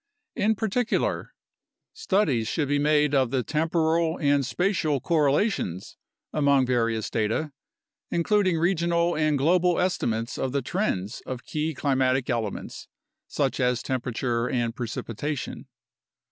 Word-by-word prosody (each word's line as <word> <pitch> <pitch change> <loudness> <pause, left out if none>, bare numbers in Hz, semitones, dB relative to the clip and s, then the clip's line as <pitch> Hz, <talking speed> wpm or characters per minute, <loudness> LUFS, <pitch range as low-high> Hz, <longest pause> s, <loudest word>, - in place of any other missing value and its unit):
In 220 +2 +2
particular: 220 +3 -1 0.6
Studies 145 - +1
should 145 +4 -1
be 145 +1 +1
made 150 0 +3
of 130 -3 +3
the 130 0 0
temporal 160 +2 +1
and 145 -2 +2
spatial 160 -1 0
correlations 145 - 0 0.4
among 140 -3 +3
various 115 -3 0
data, 115 +8 -1 0.6
including 185 0 +2
regional 170 0 +1
and 155 -1 +2
global 175 +4 +3
estimates 115 -11 -1
of 130 -1 -2
the 140 -2 0
trends 120 - -2
of 130 -1 -6
key 155 0 -2
climatic 130 -2 +1
elements 115 -4 -4 0.4
such - - -1
as 125 -1 +1
temperature 120 -1 -1
and 120 -2 -1
precipitation. 125 +3 -4
145 Hz, 120 wpm, -26 LUFS, 125-170 Hz, 0.6 s, made